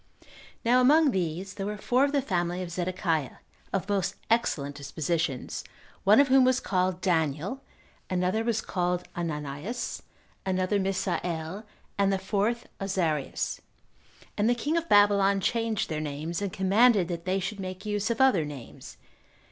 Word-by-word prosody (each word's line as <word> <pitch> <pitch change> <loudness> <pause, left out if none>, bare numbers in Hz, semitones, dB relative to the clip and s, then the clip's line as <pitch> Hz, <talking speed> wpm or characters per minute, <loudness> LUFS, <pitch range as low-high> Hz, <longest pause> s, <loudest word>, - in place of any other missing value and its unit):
Now 250 +2 +5
among 295 +3 +5
these 185 0 -2
there 195 - -4
were 210 0 -3
four 250 +5 +2
of 285 - -1
the 285 -2 +1
family 175 -4 -1
of 175 - -7
Zedekiah, 175 -4 -1 0.4
of 195 0 -1
most 200 -3 0 0.2
excellent 145 -12 +1
dispositions, 145 0 -2 0.4
one 210 +4 +6
of 280 - +6
whom 265 0 +6
was 255 0 +3
called 185 -1 0
Daniel, 165 - 0 0.5
another 185 +4 0
was 230 -1 0
called 180 -1 -1
Ananias, 155 - -4 0.4
another 185 +1 0
Misael, 185 -1 -2 0.3
and 200 0 +3
the 195 - +1
fourth 210 +5 -1
Azarias; 175 -7 -1 0.8
and 210 +3 +2
the 245 - +3
king 290 +7 -1
of 335 0 -1
Babylon 200 -1 +5
changed 225 +1 0
their 155 -1 -3
names, 155 +4 -4
and 200 -2 -2
commanded 195 +1 +4
that 170 -1 -5
they 185 +1 +1
should 195 +2 -4
make 185 +1 -6
use 210 0 -1
of 235 - -1
other 265 -11 +5
names. 145 -5 -9
190 Hz, 150 wpm, -28 LUFS, 170-220 Hz, 0.8 s, one